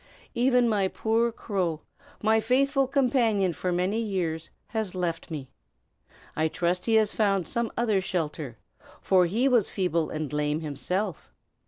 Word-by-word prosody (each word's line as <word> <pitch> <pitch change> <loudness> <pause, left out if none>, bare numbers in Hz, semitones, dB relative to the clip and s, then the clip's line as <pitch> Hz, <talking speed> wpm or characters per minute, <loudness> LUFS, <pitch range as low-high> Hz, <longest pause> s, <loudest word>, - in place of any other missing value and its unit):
Even 250 0 +3
my 205 -4 +2
poor 225 +4 +1
crow, 185 -8 -2 0.4
my 220 +1 +4
faithful 270 +4 +2
companion 235 -9 +2
for 180 +3 -2
many 180 +5 0
years, 175 -7 -2 0.2
has 220 -5 -3
left 175 -2 -2
me. 145 -5 -6 0.8
I 160 +1 +2
trust 175 +4 -1
he 225 - +3
has 215 -1 +4
found 195 -5 +1
some 235 -1 -2
other 220 -5 +2
shelter, 155 - -3 0.4
for 185 -2 +3
he 230 +9 +1
was 240 -6 +3
feeble 170 -4 0
and 155 -1 -4
lame, 150 +1 0
himself." 165 +7 -3
195 Hz, 145 wpm, -27 LUFS, 165-225 Hz, 0.8 s, my